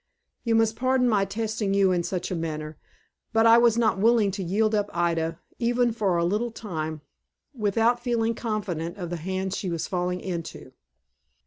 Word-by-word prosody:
You 230 -2 +1
must 225 0 +3
pardon 255 0 +2
my 205 -4 +3
testing 210 0 -2
you 195 -1 +4
in 175 -1 +1
such 180 +1 -3
a - - -1
manner, 155 -2 -4 0.6
but 225 0 +4
I 230 +1 +8
was 235 -1 +4
not 220 -4 +2
willing 220 -1 +4
to 195 - -5
yield 215 +5 +1
up 205 -1 +1
Ida, 165 -1 0 0.2
even 240 0 +2
for 205 -6 0
a 170 - +1
little 210 +7 0
time, 160 -9 -5 0.5
without 225 +1 +1
feeling 235 -2 0
confident 205 -7 -3
of 175 -3 -5
the 175 - -2
hands 190 +3 -3
she 190 -2 -3
was 170 -2 -2
falling 180 0 -1
into." 170 -3 -6
200 Hz, 180 wpm, -26 LUFS, 175-225 Hz, 0.6 s, I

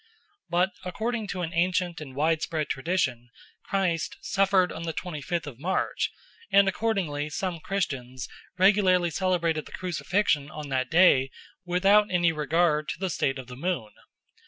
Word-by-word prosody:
But 180 +2 +2
according 220 +4 -3
to 185 -2 -3
an 165 +1 -4
ancient 175 0 0
and 135 -4 -9
widespread 155 +1 0
tradition 135 -6 -1 0.3
Christ 180 -5 -1
suffered 195 -2 +2
on 160 - -6
the 165 -1 -3
twenty 155 -2 -5
fifth 170 +3 -2
of 135 -5 -9
March, 185 +6 -1 0.4
and 200 0 +6
accordingly 185 -8 -1
some 175 +2 -3
Christians 135 -9 -3 0.3
regularly 185 -3 +4
celebrated 170 -2 0
the - - -14
Crucifixion 180 -4 0
on 150 -2 -7
that 130 -1 -1
day 160 -6 +5 0.4
without 195 +4 +4
any 175 -2 +3
regard 155 0 +1
to - - -4
the 190 -2 -1
state 135 -3 0
of 130 - -7
the 125 0 -10
moon. 155 -7 -2
170 Hz, 150 wpm, -27 LUFS, 150-185 Hz, 0.4 s, and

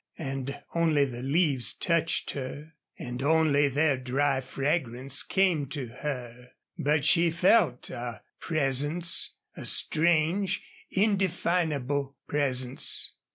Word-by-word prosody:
And 135 0 -5
only 160 -4 +2
the 120 -3 -7
leaves 140 -2 +2
touched 170 -2 0
her 145 +4 -7 0.2
and 125 +1 -6
only 145 -1 +3
their 145 +1 +1
dry 135 +2 0
fragrance 135 -1 -1
came 180 -7 +1
to 140 -1 -5 0.2
her. 125 -4 -6 0.2
But 145 0 0
she 170 +2 +4
felt 170 - +2
a 120 -2 -6 0.2
presence 155 +3 +1 0.2
a - - -8
strange, 170 +4 +1 0.3
indefinable 170 - 0
presence. 130 -3 +1
145 Hz, 105 wpm, -27 LUFS, 130-165 Hz, 0.3 s, she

